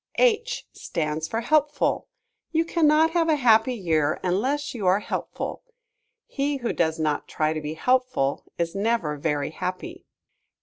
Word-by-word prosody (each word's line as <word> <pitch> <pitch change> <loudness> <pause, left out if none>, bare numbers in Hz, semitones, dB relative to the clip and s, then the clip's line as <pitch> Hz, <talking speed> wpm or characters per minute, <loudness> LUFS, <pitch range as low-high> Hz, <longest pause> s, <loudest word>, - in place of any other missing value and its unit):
H 485 0 +2
stands 155 -1 -3
for 225 - -2
Helpful. 295 +4 +1 0.4
You 330 0 +2
cannot 320 -1 +3
have 330 -1 +2
a 310 - +4
happy 245 -2 +4
year 160 -8 0
unless 265 +11 0
you 210 -7 -2
are 185 +2 +4
helpful. - - -4 0.6
He 280 0 -1
who 240 -3 -2
does 160 -1 0
not 155 -2 -1
try 155 0 0
to 155 - -4
be 150 +1 -5
helpful 250 - +1
is 170 -1 -1
never 200 -6 0
very 145 -1 -1
happy. 185 +2 -5
220 Hz, 145 wpm, -25 LUFS, -, 0.6 s, a